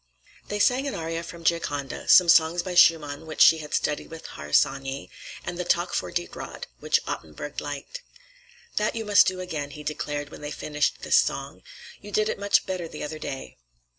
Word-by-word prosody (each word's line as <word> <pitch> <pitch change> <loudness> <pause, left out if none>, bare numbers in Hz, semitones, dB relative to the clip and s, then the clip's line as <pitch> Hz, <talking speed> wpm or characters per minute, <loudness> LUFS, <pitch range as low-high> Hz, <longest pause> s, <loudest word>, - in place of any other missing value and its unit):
Thea 205 - -2
sang 255 +6 +3
an 275 - -3
aria 165 0 -3
from 170 0 -10
'Gioconda,' 145 -5 -1
some 180 - +8
songs 165 +1 +5
by 185 - -4
Schumann 160 -3 +4
which 155 - -7
she 160 - +7
had 150 -1 -4
studied 150 - -1
with 165 0 -10
Harsanyi, 135 - 0 0.3
and 175 - -5
the - - 0
"Tak 175 0 +1
for - - -1
Dit 175 0 -3
Råd," - - -7 0.2
which - - +1
Ottenburg - - -6
liked. - - -6 0.8
"That 210 +2 +1
you 225 -1 -3
must 205 -1 +6
do 185 0 -1
again," 155 -6 -4
he 150 +1 -10
declared 145 -1 -3
when - - -11
they 150 - -5
finished 150 0 -2
this - - +4
song. - - -1 0.4
"You - - -10
did 215 +1 +1
it - - -3
much 200 0 +3
better 185 -3 -3
the 155 - -7
other 155 +1 -5
day. 135 -3 -6
165 Hz, 195 wpm, -26 LUFS, 150-185 Hz, 0.8 s, some